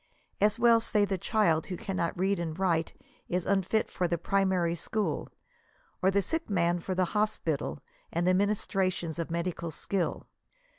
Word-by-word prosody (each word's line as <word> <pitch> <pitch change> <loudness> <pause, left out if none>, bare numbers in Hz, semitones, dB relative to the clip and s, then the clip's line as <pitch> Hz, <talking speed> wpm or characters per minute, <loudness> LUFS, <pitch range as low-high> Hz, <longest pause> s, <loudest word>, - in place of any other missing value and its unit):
As 210 +2 +4
well 235 -1 +6
say 210 -2 +2
the 195 -2 -2
child 170 -7 +2
who 180 - -4
cannot 190 -7 -2
read 190 +1 +1
and 165 -2 -3
write 170 -4 +1 0.4
is 180 -1 -1
unfit 200 +2 +1
for 180 - -1
4he 170 -1 -2
primary 190 -4 +2
school, 210 +5 -2 0.7
or 190 - +4
the 200 0 +2
sick 325 - -2
man 175 -3 +2
for 185 +2 -3
the 185 0 +2
hospital, 210 -10 -1 0.3
and 170 +1 0
the 185 - +5
minis 205 +2 +1
trations 185 -4 -1
of 165 - -2
medical 170 0 -2
skill. 180 +3 -2
185 Hz, 165 wpm, -29 LUFS, 170-200 Hz, 0.7 s, well